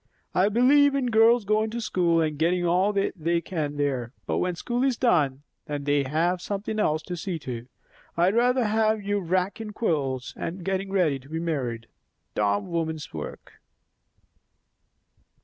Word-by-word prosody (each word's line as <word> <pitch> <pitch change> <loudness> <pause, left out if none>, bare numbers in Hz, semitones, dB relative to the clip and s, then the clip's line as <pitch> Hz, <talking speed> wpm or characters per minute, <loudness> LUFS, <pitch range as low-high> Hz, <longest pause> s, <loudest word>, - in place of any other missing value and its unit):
I 190 +3 +3
believe 275 +5 +5
in 255 -3 0
girls 225 0 +5
goin' 215 +2 +1
to 235 +2 -4
school, 175 -6 +1
and 155 -1 0
gettin' 175 +2 +2
all 180 +4 +3
they 170 -4 0
can 155 -4 -4
there; 130 -4 -1
but - - -1
when 180 -1 -1
school 240 +8 -2
is 265 -3 +1
done, 145 - +2 0.2
then 145 -2 -3
they 145 0 +2
have 170 +6 0
something 205 +3 -3
else 155 -6 +1
to 180 - -5
see 175 0 -3
to. 125 -5 -6 0.5
I'd 175 +3 +3
rather 250 +2 +3
have 215 0 +1
you 205 0 0
raakin' 190 +4 -2
quilts 135 - -1
and 175 +1 -5
gettin' 195 0 -2
ready 170 -8 +2
to 135 +2 -17
be 160 +1 -3
married; 130 -9 -2 0.5
dom' 100 +2 0
women's 160 -3 -3
work." 75 -2 -8
175 Hz, 160 wpm, -26 LUFS, 150-215 Hz, 0.5 s, believe